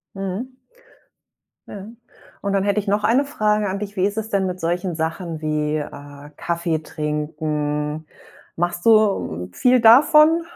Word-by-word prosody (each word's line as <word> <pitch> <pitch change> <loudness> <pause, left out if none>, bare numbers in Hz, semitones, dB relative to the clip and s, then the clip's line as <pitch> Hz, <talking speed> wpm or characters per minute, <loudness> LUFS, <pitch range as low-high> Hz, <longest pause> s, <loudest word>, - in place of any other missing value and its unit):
Mhm. 195 +7 -5 1.1
Ja. 195 -2 -8 0.6
Und 200 - -2
dann 195 -1 +1
hätte 205 +1 +1
ich 205 - -10
noch 205 +1 0
eine 255 +5 +3
Frage 210 -6 0
an 190 +1 -3
dich: 205 0 -6
Wie 190 0 +2
ist 205 +1 -3
es 220 0 -4
denn 195 -1 +1
mit 180 0 -4
solchen 175 +1 -2
Sachen 165 0 -4
wie, 155 0 -1
äh, 145 -1 -8
Kaffee 170 -1 -2
trinken? 150 0 -3 0.5
Machst 175 +2 -2
du, - - +7 0.4
hm, 90 +3 -7
viel, 250 - +3
davon? 305 +8 +6
180 Hz, 155 wpm, -21 LUFS, 155-210 Hz, 1.1 s, du